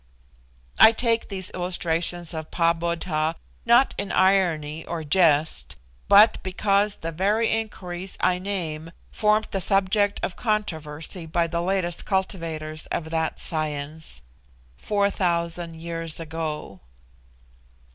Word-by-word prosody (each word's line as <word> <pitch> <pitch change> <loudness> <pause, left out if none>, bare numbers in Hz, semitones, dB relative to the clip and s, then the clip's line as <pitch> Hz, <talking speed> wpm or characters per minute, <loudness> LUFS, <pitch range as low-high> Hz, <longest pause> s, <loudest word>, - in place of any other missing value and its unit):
I 220 - +9
take 230 0 +1
these 190 -2 -2
illustrations 175 -1 -2
of 160 -1 -6
Pahbodh, 165 -1 0 0.3
not 240 +3 +5
in 200 0 -3
irony 170 -5 +2
or 170 -2 -5
jest, 155 - +2 0.3
but 205 +3 +6
because 200 +2 +1
the 165 - -5
very 205 +7 +1
inquiries 190 -4 -3
I 180 0 +2
name 165 -4 -4 0.2
formed 215 0 +2
the 195 - -2
subject 200 +2 +2
of 180 - -2
controversy 165 -6 -3
by 170 +1 +1
the 170 0 -2
latest 180 -1 0
cultivators 165 -5 -2
of 160 -1 -4
that 160 -1 -1
'science,' 150 - -3 0.5
4000 175 -4 0
years 165 0 -4
ago. 155 - -5
170 Hz, 110 wpm, -24 LUFS, 160-195 Hz, 0.5 s, I